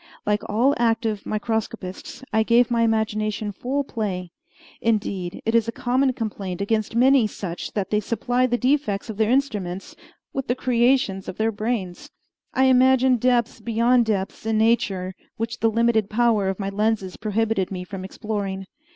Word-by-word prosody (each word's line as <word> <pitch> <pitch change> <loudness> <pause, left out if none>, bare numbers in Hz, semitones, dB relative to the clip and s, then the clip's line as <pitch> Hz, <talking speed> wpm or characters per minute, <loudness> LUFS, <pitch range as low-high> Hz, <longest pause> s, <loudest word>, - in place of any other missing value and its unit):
Like 210 0 +1
all 240 +7 +3
active 225 -3 0
microscopists, 220 - -4
I 220 - +4
gave 235 +2 +3
my 235 -1 +2
imagination 215 -1 0
full 265 +8 -2
play. 190 -8 -4 0.5
Indeed, 200 -5 -1
it 225 - +1
is 230 -1 +3
a - - -1
common 255 +3 +1
complaint 200 -6 -4
against 215 +2 -1
many 255 -1 +5
such 180 -4 -6
that 195 -3 -2
they 210 - +3
supply 245 +4 0
the 245 -1 +1
defects 250 -6 0
of 210 - -10
their 220 0 +2
instruments 210 -9 -1 0.4
with 270 -1 -3
the 245 - +1
creations 240 -6 +1
of - - -7
their 220 +1 +1
brains. 215 -4 -3 0.4
I 260 - +2
imagined 260 -1 +5
depths 240 -1 +1
beyond 235 +2 +2
depths 195 -3 -2
in 220 0 0
nature 200 -5 +1 0.2
which 230 +1 -3
the 225 - +3
limited 225 -2 +2
power 220 -3 +2
of 190 - -2
my 195 -1 -3
lenses 205 -2 -1
prohibited 215 -2 0
me 185 -2 -5
from 185 0 -7
exploring. 195 -1 -4
220 Hz, 160 wpm, -23 LUFS, 200-240 Hz, 0.5 s, many